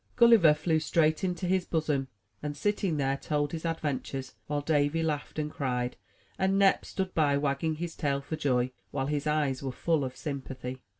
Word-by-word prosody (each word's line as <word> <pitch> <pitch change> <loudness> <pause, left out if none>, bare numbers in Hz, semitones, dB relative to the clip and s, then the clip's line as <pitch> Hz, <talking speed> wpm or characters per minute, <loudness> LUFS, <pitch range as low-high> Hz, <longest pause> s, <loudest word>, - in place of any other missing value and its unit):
Gulliver 230 -11 +7
flew 160 +1 +1
straight 155 +1 +2
into 180 -1 -1
his 185 0 +2
bosom, 150 -5 0 0.3
and, 145 -1 -4
sitting 200 -5 0
there, 135 -1 +1
told 145 0 -1
his 165 0 -5
adventures; 140 -4 -3
while 145 -1 -1
Davy 145 +1 +1
laughed 150 -2 -2
and 150 -1 -2
cried, 125 -3 -2 0.4
and 190 +1 +2
Nep 195 -1 +4
stood 190 -1 -3
by, 145 -3 +3
wagging 145 +2 0
his 170 +1 -5
tail 140 -2 0
for 140 +3 -5
joy, 130 -5 +1 0.2
while 135 +3 -2
his 145 +1 -1
eyes 150 -4 +1
were 135 -1 -3
full 160 +3 0
of 130 -1 -5
sympathy. 130 -3 -5
150 Hz, 180 wpm, -29 LUFS, 140-165 Hz, 0.4 s, Gulliver